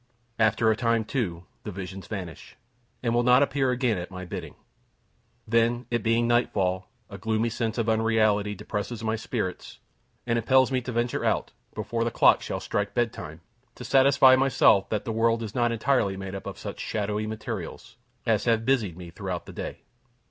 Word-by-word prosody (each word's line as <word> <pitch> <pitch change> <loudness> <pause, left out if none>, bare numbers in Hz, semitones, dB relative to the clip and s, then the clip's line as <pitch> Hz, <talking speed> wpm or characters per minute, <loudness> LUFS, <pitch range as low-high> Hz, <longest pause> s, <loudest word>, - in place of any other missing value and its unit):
After 110 +1 +3
a - - +2
time, 115 -1 +1
too, 95 -10 -3 0.2
the 105 - -6
visions 95 0 -7
vanish, 90 -6 -7 0.5
and 115 -2 +1
will 120 - +3
not 125 +3 +5
appear 140 -1 +1
again 125 -5 +1
at 90 - -6
my 95 -1 -7
bidding. 90 - -7 0.9
Then, 115 +2 +2
it 120 -1 +1
being 115 +1 +2
nightfall, 95 -6 +1 0.2
a 100 -2 -10
gloomy 110 +2 0
sense 115 0 -2
of 115 -2 0
unreality 110 -2 +2
depresses 105 +3 -5
my 110 0 0
spirits, 110 -4 -4 0.5
and 115 0 +1
impels 130 +3 +4
me 130 -1 +1
to 125 - -5
venture 120 +1 -1
out, - - 0 0.2
before 115 0 -2
the 115 - 0
clock - - +5
shall - - -4
strike 100 0 -2
bedtime, 110 -10 -2 0.3
to 125 - -9
satisfy 135 +1 +6
myself 130 -7 +4
that 105 -2 -2
the 115 - -2
world 115 +1 +1
is 110 -1 -6
not 120 -2 +1
entirely 115 -4 +1
made 95 0 -6
up 95 - -6
of - - -6
such - - -7
shadowy 105 0 -2
materials, 110 +1 -6 0.3
as 110 -3 +1
have 115 -1 +2
busied 110 -11 +1
me 90 -2 -9
throughout 95 -1 -5
the - - -10
day. - - -6
110 Hz, 180 wpm, -26 LUFS, 100-120 Hz, 0.9 s, satisfy